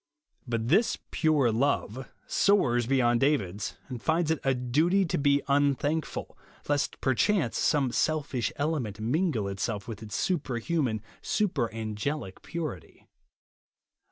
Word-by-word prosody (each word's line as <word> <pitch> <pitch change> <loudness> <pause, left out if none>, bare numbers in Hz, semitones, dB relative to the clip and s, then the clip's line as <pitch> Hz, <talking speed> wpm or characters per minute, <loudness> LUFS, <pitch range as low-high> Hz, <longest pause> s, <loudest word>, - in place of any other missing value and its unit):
But 115 -1 -1
this 215 - +3
" - - -48
pure 150 -7 +3
love" 130 0 -1 0.2
soars 120 - +2
beyond 120 -3 +3
David's, 105 -8 0
and 125 -4 -6
finds 160 +2 +1
it 160 - 0
a 135 -1 +2
duty, 155 +11 +2
to 165 - -1
be 140 0 +3
unthankful, 145 +2 0 0.3
lest 145 0 0
perchance 140 - +2
some 140 -4 +2
selfish 140 -5 0
element 140 -9 -2
mingle 125 - 0
itself 100 +3 -3
with 115 -2 -7
its 105 -1 -6
superhuman, 135 - -1 0.2
super 175 - 0
an 110 -1 -5
gelicpuritj 145 - -5
135 Hz, 125 wpm, -28 LUFS, 115-155 Hz, 0.3 s, this